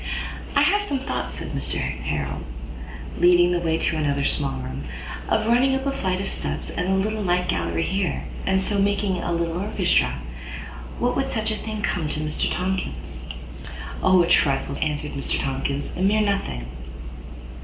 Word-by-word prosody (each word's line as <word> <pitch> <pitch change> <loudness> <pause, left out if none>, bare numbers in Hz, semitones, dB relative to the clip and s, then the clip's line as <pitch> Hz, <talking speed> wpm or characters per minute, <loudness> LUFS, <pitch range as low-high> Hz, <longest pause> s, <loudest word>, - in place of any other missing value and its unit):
"I - - +6
have 410 - +4
some 290 -9 0
thoughts," - - -2
said - - -4
Mr - - 0
Harrel, 70 +2 -2 0.8
leading 175 0 +6
the 175 - +2
way 165 -1 +1
to 165 - +1
another 140 -2 +1
small - - +2
room, 65 +2 -5 0.4
"of - - +3
running 250 +4 +4
up 265 0 -2
a 275 - +2
flight 185 -8 0
of 195 - -2
steps - - -2
and 180 - -1
a 190 - +4
little 215 +3 0
light 180 -2 +2
gallery 85 -1 0
here, 195 -1 0 0.2
and 190 0 +3
so 200 +1 0
making 200 -2 +2
a 175 - -2
little 170 0 0
Orchestra. 200 - +2 0.8
What - - +1
would - - 0
such 220 0 0
a - - +1
thing 215 -1 -4
come 160 -4 0
to, 150 - -1
Mr 155 0 0
Tomkins?" 70 - -3 0.8
"O, 185 -1 +6
a - - 0
trifle, 140 -5 +3
sir," - - -6
answered 150 -1 -1
Mr 140 - -1
Tomkins, 140 +1 -2
"a - - -3
mere 205 +3 +4
nothing." 195 - 0
175 Hz, 175 wpm, -24 LUFS, 140-200 Hz, 0.8 s, I